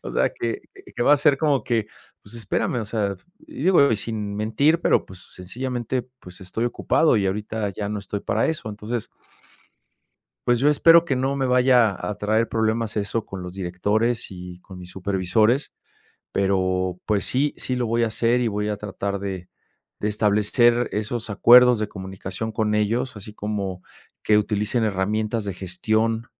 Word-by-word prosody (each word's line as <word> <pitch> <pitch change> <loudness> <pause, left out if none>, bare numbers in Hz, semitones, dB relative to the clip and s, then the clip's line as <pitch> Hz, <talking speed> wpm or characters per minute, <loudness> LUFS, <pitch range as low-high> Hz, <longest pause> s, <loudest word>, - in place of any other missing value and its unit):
o - - -6
sea - - +1
que - - -3 0.4
que - - 0
va 145 - +5
a - - +1
ser 145 -1 +4
como 140 -6 +2
que, 115 -3 0 0.4
pues, 100 - -12
espérame, 115 +2 -2
o - - -4
sea, 100 -3 -2 0.3
y 310 -2 -8
digo, 165 -9 +5
y - - +1
sin 105 -1 -4
mentir, 140 +10 +2
pero, - - +2
pues, 95 -1 -14
sencillamente, 125 +6 -4 0.2
pues, 90 -1 -13
estoy 95 +5 -3
ocupado 140 +3 +2
y 100 - 0
ahorita 105 +2 -2
ya 100 +1 -5
no 105 - -3
estoy 100 +1 -5
para 110 +3 0
eso. 155 -8 -3
Entonces 105 +2 -5 1.4
pues 120 -1 +3
yo 140 +4 +4
espero 165 +3 +6
que 140 - 0
no 135 +2 0
me 135 -1 0
vaya 125 -4 +4
a 105 - -3
traer 110 +3 +1
problemas 110 0 -1
eso, 105 +2 -2
con 95 -1 -7
los 90 0 -8
directores, 105 +6 -1
y 90 -1 -9
con 95 -2 -12
mis 90 0 -10
supervisores, 100 +7 +1 0.6
pero 95 -2 0
pues 105 -2 0
sí, 140 +3 0
sí, 130 - -3
lo 125 -2 -1
voy 115 +1 +2
a - - 0
hacer, 115 +2 +1
y 125 - +1
voy 105 -1 -1
a 105 - -2
tratar 100 -1 -4
de 95 -2 -6 0.5
de 105 - -1
establecer 110 +3 +2
esos 110 +2 -3
acuerdos 125 +3 +7
de 110 -1 -2
comunicación 95 +2 -6
con 110 -1 -1
ellos, 115 +5 0
así 105 +1 -9
como 100 -4 -4 0.4
que 105 - +4
utilicen 105 +3 0
herramientas 110 +2 -1
de 100 -2 -4
gestión, 110 +5 -1
110 Hz, 175 wpm, -23 LUFS, 100-120 Hz, 1.4 s, acuerdos